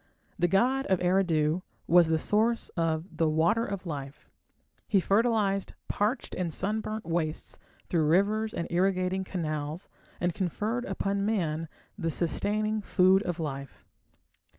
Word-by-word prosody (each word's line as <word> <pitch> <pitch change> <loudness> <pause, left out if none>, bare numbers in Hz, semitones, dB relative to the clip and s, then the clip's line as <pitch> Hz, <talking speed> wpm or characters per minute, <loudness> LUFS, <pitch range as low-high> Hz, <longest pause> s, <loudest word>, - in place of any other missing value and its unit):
The 175 - +4
god 250 +9 +2
of 190 - +3
Eridu 175 -3 +2 0.2
was 175 -1 +6
the 160 0 +2
source 220 +7 +1
of 165 0 -2
the 160 -1 +3
"water 165 +9 +2
of 200 -3 -4
life". 140 -3 -7 0.6
He 200 - +3
fertilized 200 -1 +1
parched 210 +6 -1
and 175 -3 -2
sunburnt 215 +5 -3
wastes 165 -2 -2 0.3
through 160 -3 +1
rivers 210 +6 +2
and 170 - -3
irrigating 185 +1 +1
canals, 155 -2 -4 0.3
and 175 0 0
conferred 210 +7 -2
upon 195 +1 -1
man 165 -7 -1 0.3
the 165 -3 0
sustaining 210 +7 0
"food 190 -1 +4
of 175 -4 -3
life". 140 -3 -6
185 Hz, 130 wpm, -28 LUFS, 165-205 Hz, 0.6 s, was